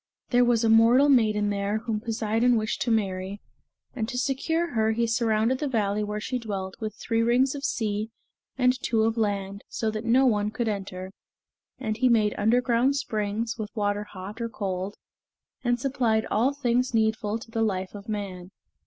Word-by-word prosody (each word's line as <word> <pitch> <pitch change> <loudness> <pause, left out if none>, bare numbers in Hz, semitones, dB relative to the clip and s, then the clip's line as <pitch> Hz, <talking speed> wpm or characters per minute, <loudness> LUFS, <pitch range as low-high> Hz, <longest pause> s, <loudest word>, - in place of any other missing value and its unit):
There 245 0 +5
was 240 -1 +2
a 225 - +3
mortal 230 +6 +6
maiden 215 -5 +3
there 200 +1 -1
whom 220 -1 -2
Poseidon 225 +2 +1
wished 215 +1 -2
to 240 - 0
marry, 195 -3 -1 0.6
and 225 -3 -2
to 250 - -4
secure 320 +6 0
her 220 -1 +2
he 235 +1 +1
surrounded 230 +1 +1
the 295 - -1
valley 210 -4 0
where 210 0 -3
she 250 +4 -3
dwelt 195 -4 -4
with 215 -1 -4
three 230 -1 -1
rings 245 +3 +3
of 285 -1 -7
sea 215 -5 -1 0.5
and 250 -1 +4
two 225 -2 +1
of 225 0 +1
land 200 -2 -2
so 220 -1 -1
that 215 0 -4
no 245 +3 +4
one 210 -4 +2
could 225 +2 -3
enter; 190 -3 -4 0.7
and 220 -4 -3
he 255 +2 +3
made 215 -3 +3
underground 245 +4 +2
springs, 220 -3 -2
with 210 -1 -4
water 205 -1 -1
hot 205 +3 -9
or 230 - -2
cold, 195 -2 -4 0.7
and 240 -1 +1
supplied 235 -4 +1
all 235 +6 +3
things 250 -3 0
needful 220 -1 +1
to 230 0 -12
the 225 - -1
life 190 -4 -1
of 205 +1 -10
man. 190 -4 -5
220 Hz, 180 wpm, -26 LUFS, 210-240 Hz, 0.7 s, mortal